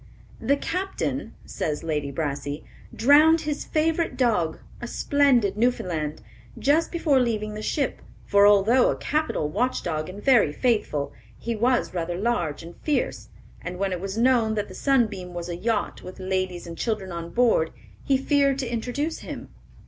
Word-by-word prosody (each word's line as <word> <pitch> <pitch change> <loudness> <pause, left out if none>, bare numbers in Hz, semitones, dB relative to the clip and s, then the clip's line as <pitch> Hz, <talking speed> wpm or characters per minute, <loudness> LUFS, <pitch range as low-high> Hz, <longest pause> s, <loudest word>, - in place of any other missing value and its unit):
"The 280 - +2
captain," 370 +6 -3
says 150 0 -3
Lady 150 -3 -2
Brassey, 145 0 -3 0.3
"drowned 305 +6 +5
his 295 -2 -3
favorite 320 -3 0
dog, 210 -11 +1 0.2
a 240 - -4
splendid 255 -7 +2
Newfoundland, 175 -10 -1 0.3
just 300 +4 +2
before 315 -6 +2
leaving 215 -4 -1
the 210 - -6
ship; 275 +4 -1 0.2
for 200 0 +5
although 205 +5 +5
a - - 0
capital 305 - -1
watchdog 175 -5 -1
and 190 +2 -8
very 235 - +4
faithful, 155 - 0 0.2
he 235 0 -3
was 240 +1 +1
rather 175 -1 -2
large 180 -9 -1
and 170 +1 -11
fierce; 300 -2 -2 0.3
and 180 +1 -6
when 195 0 -1
it 180 -1 -3
was 195 +2 -4
known 235 -2 +3
that 210 -1 -2
the - - -9
Sunbeam 210 -10 0
was 175 0 -5
a 170 - -3
yacht 210 +4 -1
with 185 +1 -10
ladies 185 -1 -2
and 165 -1 -8
children 210 -5 -2
on 170 0 -5
board, 230 -7 +3 0.3
he 270 - +3
feared 275 0 +2
to 250 -3 -3
introduce 265 +7 -2
him. - - -8
220 Hz, 160 wpm, -25 LUFS, 175-265 Hz, 0.3 s, drowned